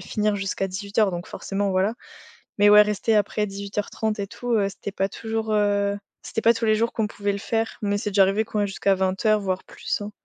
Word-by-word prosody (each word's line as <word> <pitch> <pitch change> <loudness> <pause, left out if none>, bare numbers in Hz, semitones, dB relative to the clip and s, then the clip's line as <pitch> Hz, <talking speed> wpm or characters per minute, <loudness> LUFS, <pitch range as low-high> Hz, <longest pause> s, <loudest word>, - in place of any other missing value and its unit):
finir 210 -1 -1
jusqu'à 195 0 -2
18:00, 200 +2 0
donc 175 0 -5
forcément, 200 0 -3
voilà. 190 +4 +2 0.7
Mais 205 0 +6
ouais, 210 0 +9
rester 210 +1 0
après 210 +1 0
18:30 200 +2 -3
et 200 - -2
tout, 245 +3 -4
heu, 200 -3 +2
c'était 200 0 -7
pas 195 +1 0
toujours, 220 0 -3
heu, 205 -1 +2 0.2
c'était 225 - -4
pas 230 +1 +5
tous 230 - -5
les 215 -1 +4
jours 230 +2 0
qu'on 220 -2 0
pouvait 205 -1 -2
le - - -3
faire, 225 +2 -2
mais 205 0 0
c'est 210 0 -3
déjà 195 0 +4
arrivé 195 +3 +3
qu'on 215 -2 -3
reste 205 - +1
jusqu'à 195 0 +1
20:00, 190 +3 +1
voire 190 -1 -2
plus, - - -4
hein. 205 +1 -5
205 Hz, 225 wpm, -24 LUFS, 195-215 Hz, 0.7 s, ouais